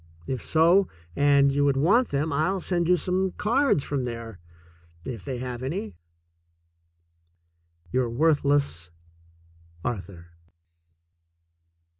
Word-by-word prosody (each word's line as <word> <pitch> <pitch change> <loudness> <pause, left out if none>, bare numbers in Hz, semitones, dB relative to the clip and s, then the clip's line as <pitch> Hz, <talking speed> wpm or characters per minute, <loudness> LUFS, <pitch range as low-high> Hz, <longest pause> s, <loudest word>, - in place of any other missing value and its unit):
If 130 +5 -4
so, 170 +4 +4 0.3
and 140 -1 +4
you 145 +1 +1
would 140 -1 +2
want 205 - +3
them, 145 +2 -1
I'll 180 +7 0
send 175 -1 -1
you 180 - +5
some 185 +1 -1
cards 235 - +1
from 140 -3 -2
there 115 -4 -7 0.3
— 85 0 -29
if 100 - -13
they 125 +7 -4
have 125 -1 -5
any. 130 - -4 2.0
Your 125 -2 +1
worthless, 140 - +1 1.0
Arthur. 95 -7 -5
140 Hz, 110 wpm, -25 LUFS, 115-170 Hz, 2.0 s, you